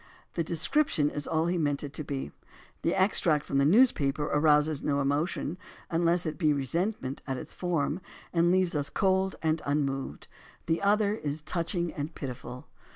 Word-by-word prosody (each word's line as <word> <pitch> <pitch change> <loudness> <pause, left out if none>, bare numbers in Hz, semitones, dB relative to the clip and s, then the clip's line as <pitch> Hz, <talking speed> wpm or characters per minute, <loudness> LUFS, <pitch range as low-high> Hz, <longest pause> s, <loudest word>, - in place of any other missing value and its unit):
The 170 - 0
description 165 - +1
is 145 -1 -4
all 160 0 +1
he 175 +1 0
meant 145 -2 0
it 140 -1 -6
to 155 - -5
be. 140 -2 -4 0.5
The 170 - +1
extract 175 -6 +3
from 140 - 0
the 140 - +4
news 235 - +6
paper 140 0 -1
arouses 150 0 +3
no 140 -1 0
emotion, 145 +4 -1 0.3
unless 170 +1 +2
it 155 +1 -4
be 155 -4 +3
resentment 140 - -2
at 135 -1 -2
its - - -7
form, 170 -1 -1 0.3
and 170 0 +3
leaves 185 -1 +2
us 145 -2 -1
cold 190 -1 +1
and 160 0 +1
unmoved. 140 -2 -2 0.4
The 165 0 0
other 205 +1 +3
is 150 -7 -4
touching 170 +1 -1
and 150 +2 -5
pitiful. 125 -2 -7
155 Hz, 170 wpm, -29 LUFS, 145-175 Hz, 0.5 s, news